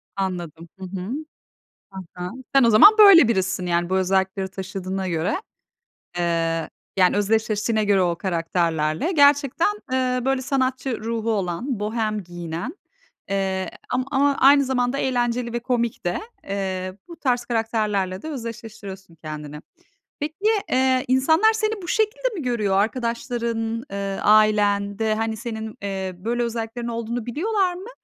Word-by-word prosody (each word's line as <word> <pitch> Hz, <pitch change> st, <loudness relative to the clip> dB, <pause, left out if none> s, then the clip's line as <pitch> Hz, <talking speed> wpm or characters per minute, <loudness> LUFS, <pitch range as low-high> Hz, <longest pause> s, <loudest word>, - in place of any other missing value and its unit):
Anladım. 175 Hz, -4 st, -4 dB
Hı 190 Hz, -, -6 dB
hı. 185 Hz, 0 st, -6 dB, 0.9 s
Hı 190 Hz, -, -7 dB, 0.2 s
hı, 180 Hz, 0 st, -4 dB, 0.2 s
sen 270 Hz, -3 st, +6 dB
o 230 Hz, -, +5 dB
zaman 315 Hz, -, +9 dB
böyle 380 Hz, -, +9 dB
birisisin 190 Hz, -3 st, 0 dB
yani 175 Hz, +1 st, 0 dB
bu 190 Hz, -, +2 dB
özellikleri 190 Hz, +1 st, 0 dB
taşıdığına 190 Hz, 0 st, -4 dB
göre. 175 Hz, -, -1 dB, 0.8 s
Eee, 165 Hz, -2 st, 0 dB, 0.3 s
yani 185 Hz, +1 st, +4 dB
özdeşleştiğine 215 Hz, +1 st, +1 dB
göre 200 Hz, -2 st, +3 dB
o 175 Hz, -1 st, +1 dB
karakterlerle 165 Hz, -, 0 dB
gerçekten, 285 Hz, 0 st, +4 dB, 0.3 s
ııı, 255 Hz, -1 st, 0 dB
böyle 270 Hz, -1 st, +1 dB
sanatçı 260 Hz, -2 st, -1 dB
ruhu 230 Hz, 0 st, -1 dB
olan, 205 Hz, +5 st, -2 dB
bohem 215 Hz, -1 st, -2 dB
giyinen, 175 Hz, -, -6 dB, 0.5 s
eee, 190 Hz, -1 st, -1 dB, 0.2 s
am 255 Hz, +1 st, 0 dB
ama 280 Hz, 0 st, +3 dB
aynı 280 Hz, +1 st, +6 dB
zamanda 250 Hz, 0 st, 0 dB
eğlenceli 240 Hz, -2 st, -1 dB
ve 240 Hz, -, -1 dB
komik 235 Hz, -4 st, -2 dB
de, 175 Hz, -, 0 dB, 0.2 s
eee, 190 Hz, -1 st, -3 dB
bu 340 Hz, -, -10 dB
tarz 245 Hz, -3 st, 0 dB
karakterlerle 215 Hz, -5 st, -1 dB
de 315 Hz, -, -6 dB
özdeşleştiriyorsun 220 Hz, -, -8 dB
kendini. 150 Hz, -1 st, -8 dB, 0.6 s
Peki, 300 Hz, +1 st, -3 dB, 0.4 s
eee, 260 Hz, 0 st, +2 dB
insanlar 320 Hz, -, +4 dB
seni 435 Hz, -2 st, -1 dB
bu 350 Hz, -, -8 dB
şekilde 445 Hz, +5 st, 0 dB
mi 335 Hz, -, -4 dB
görüyor? 215 Hz, -6 st, 0 dB
Arkadaşların, 230 Hz, 0 st, -1 dB
ııı, 195 Hz, -1 st, -3 dB
ailen 205 Hz, -1 st, +3 dB
de 220 Hz, -1 st, +1 dB
hani 220 Hz, 0 st, -2 dB
senin, 220 Hz, -1 st, -6 dB
eee, 190 Hz, -2 st, -4 dB
böyle 240 Hz, +4 st, -1 dB
özelliklerin 235 Hz, +1 st, -4 dB
olduğunu 235 Hz, 0 st, -3 dB
biliyorlar 370 Hz, -, 0 dB
mı? 385 Hz, +6 st, -9 dB
220 Hz, 140 wpm, -23 LUFS, 190-255 Hz, 0.9 s, zaman